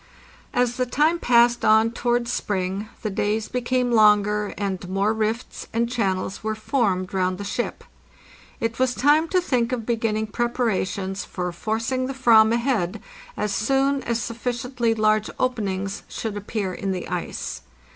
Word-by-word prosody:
As 245 -1 +1
the 255 -1 0
time 305 +7 +2
passed 240 -2 +4
on 220 +1 +5
towards 240 0 0
spring 195 +1 -2
the 215 - -1
days 210 +2 -1
became 250 0 0
longer, 210 -2 +4
and 190 -3 -3
more 195 +3 +1
rifts 220 +2 -3
and 230 +1 +1
channels 195 -6 -2
were 215 0 -1
formed 205 -5 0
round 185 -1 0
the 205 - -5
ship. 200 +4 -3 0.8
It 230 +1 -2
was 255 -1 +2
time 300 +4 +4
to 365 - +2
think 250 -9 0
of 240 -3 -2
beginning 220 -2 0
preparations 205 -5 -1
for 180 -1 -4
forc 220 +7 -2
ing 255 0 0
the 270 - -5
/vam 225 -4 +6
ahead 230 -5 0 0.4
as 210 -1 -1
soon 270 +6 +1
as 235 -1 0
sufficiently 235 0 -2
large 215 0 +2
openings 200 -6 -1
should 220 -2 -4
appear 205 -2 -3
in 195 +1 -2
the 180 - -5
ice. - - -4
225 Hz, 155 wpm, -23 LUFS, 205-245 Hz, 0.8 s, vam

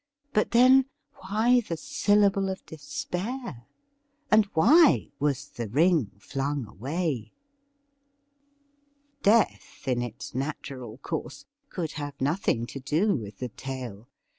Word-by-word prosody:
But, 210 - +2
then, 255 +3 +6 0.4
why 230 +5 +4
the 170 -7 -5
syllable 200 +2 +2
of 190 0 -6
despair? 175 - -5 0.6
And 215 0 +6
why 290 - +5
was 140 -1 -1
the 120 -2 -5
ring 155 - +3
flung 135 +4 -3
away 130 - -3 0.8
.'' 285 0 -43
Death, 215 - +2
in 125 -2 +1
its 120 0 -6
natural 130 -4 -5
course, 160 +3 -5 0.2
could 165 -4 -3
have 145 -2 -6
nothing 135 -5 0
to 130 +4 -7
do 160 +10 +1
with 105 -6 -6
the 125 - -4
tale. 125 -4 -7
160 Hz, 115 wpm, -27 LUFS, -, 0.8 s, then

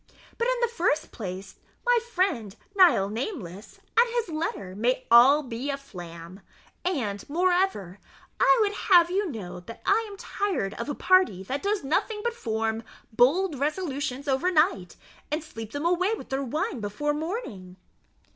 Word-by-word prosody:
But, 470 - +1
in - - +2
the 475 - +3
first 355 -9 0
place, 190 -2 -7 0.3
my - - +4
friend 255 - 0 0.2
Nihil 340 - +5
Nameless 220 - -6 0.2
and 470 +2 +5
his 465 -6 0
letter 310 - -4
may 235 +5 +2
be 255 - -20
all 265 +5 +7
a 260 +4 -3
flam; 175 -7 -10 0.4
and, 225 - -2
moreover, 350 - +1 0.4
I - - +5
would 410 -1 +2
have 350 -4 +4
you 395 0 0
know 195 - -7
that 205 +6 -11
I 455 - +3
am 400 - -10
tired 380 - -2
of - - -5
a 290 - -2
party 370 - +3
that 265 +8 -3
does 405 -2 -1
nothing 420 +9 -1
but 475 - 0
form 225 - -2 0.3
bold 290 +7 +3
resolutions 285 -3 -2
overnight, 305 - +1 0.4
and 305 +1 -1
sleep 225 -8 -9
them 290 +3 -4
away 365 +5 +2
with - - -11
their 270 +1 -1
wine 265 -1 -2
before 220 +9 -2
morning. 295 - -5
285 Hz, 155 wpm, -26 LUFS, -, 0.4 s, all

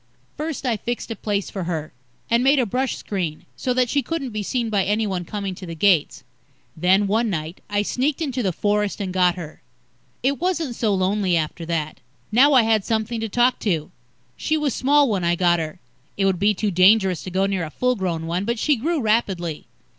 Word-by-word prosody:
First 305 -2 -4
I 235 -3 +1
fixed 240 +2 -4
a - - -2
place 205 -1 -2
for 190 -4 -4
her, 160 -3 -4 0.3
and 235 +1 +2
made 275 +2 +5
a 255 - +3
brush 255 +5 -1
screen, 175 -7 -4
so 255 - -2
that 250 -1 +3
she 280 +4 +1
couldn't 275 -1 -4
be 215 -1 -3
seen 230 +2 -2
by 200 -2 +2
anyone 200 -3 -1
coming 200 +1 -4
to 185 0 -9
the 165 - -6
gates. 170 -2 +2 0.5
Then, 185 +5 +3
one 220 +3 +1
night, 160 -1 -4
I 205 0 +1
sneaked 270 +8 -1
into 270 -6 -2
the 195 -5 0
forest 205 +3 0
and 190 -3 -3
got 180 -2 +3
her. 165 -4 -9 0.6
It 275 +2 +1
wasn't 335 -8 -1
so 220 -3 0
lonely 185 -1 +1
after 160 +1 -3
that. 155 -2 -2 0.3
Now 270 +6 +6
I 255 -3 +6
had 220 -2 +2
something 225 +2 -1
to 225 0 -3
talk 245 +3 +2
to. 165 -8 -1 0.4
She 315 - 0
was 295 -5 0
small 285 +2 +3
when 200 -6 -1
I 170 0 +2
got 175 -1 +3
her 155 -1 -5 0.4
it 195 - +1
would 190 -2 +1
be 205 +1 +3
too 205 +2 -1
dangerous 190 -1 +4
to - - -6
go 190 +2 +1
near 195 -3 -1
a 160 - -4
full 250 +10 0
grown 175 -5 -2
one 175 +3 -1
but 235 +3 -1
she 295 +4 +2
grew 320 +7 -1
rapidly. 195 -8 -1
205 Hz, 215 wpm, -22 LUFS, 180-245 Hz, 0.6 s, Now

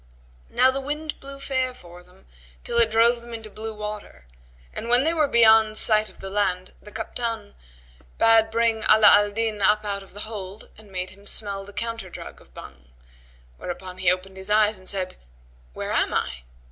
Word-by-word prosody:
Now 260 - +4
the 270 +1 -4
wind 295 +2 -5
blew 275 0 -10
fair 260 -2 -1
for 175 -4 -13
them 180 0 -23 0.4
till 235 - 0
it 230 -1 +5
drove 235 +2 +3
them 235 0 -9
into 220 -2 -10
blue 220 +2 -6
water, 210 - -7 0.5
and 230 - -6
when 245 +2 +5
they 325 +3 +2
were 310 -3 +2
beyond 220 -3 +5
sight 215 -1 +4
of - - -17
land 190 -2 -2
the 210 - -13
Kaptбn[FN#117] 230 - -5 0.6
bade 225 -1 +5
bring 225 -1 +1
Ala 215 -1 +8
al 205 0 +5
Din 220 0 -2
up 210 +2 +3
out 200 -1 -3
of 195 0 -17
the 205 - -7
hold 205 -2 -8
and 210 -2 -17
made 185 0 -4
him 200 +2 -17
smell 200 -2 -1
the 200 - -12
counter 230 -2 -5
drug - - -10
of - - -22
Bhang; 60 -1 -13 0.7
whereupon 185 +1 -7
he 185 -1 +3
opened 190 +1 -4
his 190 +1 -8
eyes 210 -1 +3
and 185 - -8
said, 185 -2 -4 0.6
"Where - - -5
am - - +1
I?" 60 - -2
215 Hz, 190 wpm, -24 LUFS, 195-230 Hz, 0.7 s, Ala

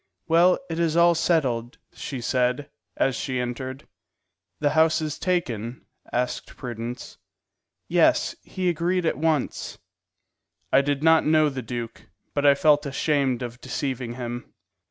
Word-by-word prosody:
"Well, 170 +2 +5
it 165 - -4
is 165 -1 +1
all 170 0 +6
settled," 135 -7 0 0.2
she 130 -4 -6
said, 125 +3 0 0.3
as 135 - +2
she 130 -1 -2
entered. 130 +2 -5 0.7
"The 145 -1 +2
house 160 0 +4
is 155 -1 -4
taken?" 125 - -2 0.3
asked 125 +1 -2
Prudence. 120 0 -6 0.7
"Yes; - - +3
he 185 -1 -3
agreed 175 +1 +1
at 160 - 0
once." 155 -3 -1 1.0
I - - +7
did 145 +1 -1
not 160 -1 +5
know 155 -1 +4
the 135 -2 -5
duke, 120 0 -6 0.3
but 145 0 +2
I 140 - +7
felt 145 0 +3
ashamed 140 -3 0
of 120 0 -7
deceiving 130 -2 -3
him. 120 -1 -6
140 Hz, 135 wpm, -25 LUFS, 125-160 Hz, 1.0 s, I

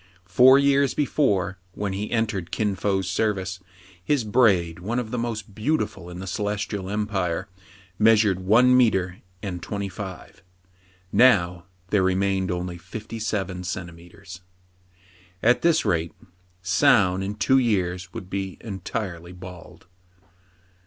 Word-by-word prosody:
Four 125 +9 +6
years 140 -1 +3
before, 100 - 0
when 100 -2 -3
he 105 +2 -4
entered 110 -7 -1
Kin 105 0 -1
Fo's 95 -1 -1
service, 95 -3 -1 0.4
his 140 +5 +1
braid, 100 -8 +2
one 110 +7 -3
of 115 -3 -3
the 125 - -2
most 110 -4 -4
beautiful 110 - -2
in 90 - -8
the 95 - -6
Celestial 100 0 -3
Empire, 100 -4 -2 0.5
measured 105 -3 +4
one 115 +7 +5
metre 95 -7 +2 0.3
and 90 -4 -4
twenty 100 +3 -4
five. 95 -2 -9 0.7
Now 90 -8 +4 0.3
there 100 - +3
remained 95 0 +1
only 90 0 -3
fifty 110 +4 -8
seven 95 -4 -3
centimetres. 90 +1 -8 1.0
At 120 +2 +4
this 170 -6 +3
rate, 85 -5 0 0.5
Soun 95 +1 +3
in 100 +2 -3
two 130 +5 +3
years 90 -6 -1
would 100 -4 -8
be 95 -1 -4
en 100 -4 -6
tirely 90 -6 -5
bald. 90 -1 -12
100 Hz, 130 wpm, -24 LUFS, 90-110 Hz, 1.0 s, Four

